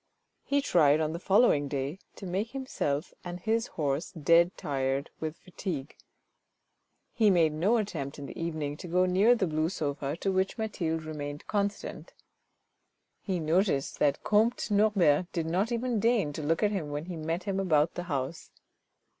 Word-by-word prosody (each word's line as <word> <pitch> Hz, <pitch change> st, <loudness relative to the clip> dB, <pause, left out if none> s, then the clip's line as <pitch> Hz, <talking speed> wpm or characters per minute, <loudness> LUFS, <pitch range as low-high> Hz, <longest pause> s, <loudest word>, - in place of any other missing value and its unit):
He 280 Hz, 0 st, 0 dB
tried, 155 Hz, -, +4 dB
on 155 Hz, 0 st, 0 dB
the 170 Hz, -, -4 dB
following 190 Hz, -7 st, +4 dB
day, 140 Hz, +5 st, -3 dB, 0.2 s
to 195 Hz, -, -9 dB
make 195 Hz, +6 st, -2 dB
himself 185 Hz, -, -2 dB
and 175 Hz, 0 st, -6 dB
his 225 Hz, +4 st, 0 dB
horse 145 Hz, 0 st, -2 dB
dead 170 Hz, +2 st, +3 dB
tired 135 Hz, 0 st, -2 dB
with 160 Hz, 0 st, -4 dB
fatigue. 165 Hz, -6 st, -6 dB, 1.2 s
He 220 Hz, -4 st, +4 dB
made 165 Hz, -5 st, +4 dB
no 190 Hz, +10 st, +2 dB
attempt 155 Hz, -10 st, -3 dB
in 145 Hz, -, -7 dB
the -, -, -9 dB
evening 155 Hz, -3 st, -3 dB
to 180 Hz, -, -8 dB
go 180 Hz, +2 st, +3 dB
near 195 Hz, +7 st, +4 dB
the 210 Hz, -, +1 dB
blue 155 Hz, -1 st, 0 dB
sofa 145 Hz, -3 st, -3 dB
to 195 Hz, -, -1 dB
which 190 Hz, +3 st, 0 dB
Mathilde 165 Hz, -8 st, -2 dB
remained 145 Hz, -2 st, -6 dB
constant. 205 Hz, -, -3 dB, 1.1 s
He 190 Hz, -3 st, -2 dB
noticed 160 Hz, -2 st, +1 dB
that 145 Hz, -1 st, +2 dB
comte 215 Hz, +2 st, +2 dB
Norbert 190 Hz, -6 st, +3 dB
did 165 Hz, -3 st, -1 dB
not 185 Hz, +8 st, 0 dB
even 240 Hz, -1 st, 0 dB
deign 215 Hz, -9 st, +2 dB
to 155 Hz, -, -5 dB
look 160 Hz, +5 st, 0 dB
at 210 Hz, -, +3 dB
him 180 Hz, -8 st, -3 dB
when 145 Hz, +2 st, -4 dB
he 180 Hz, -1 st, -6 dB
met 165 Hz, +3 st, -3 dB
him 195 Hz, 0 st, -2 dB
about 160 Hz, -4 st, +2 dB
the 175 Hz, -, -5 dB
house. 140 Hz, +2 st, -3 dB
170 Hz, 170 wpm, -29 LUFS, 150-200 Hz, 1.2 s, tried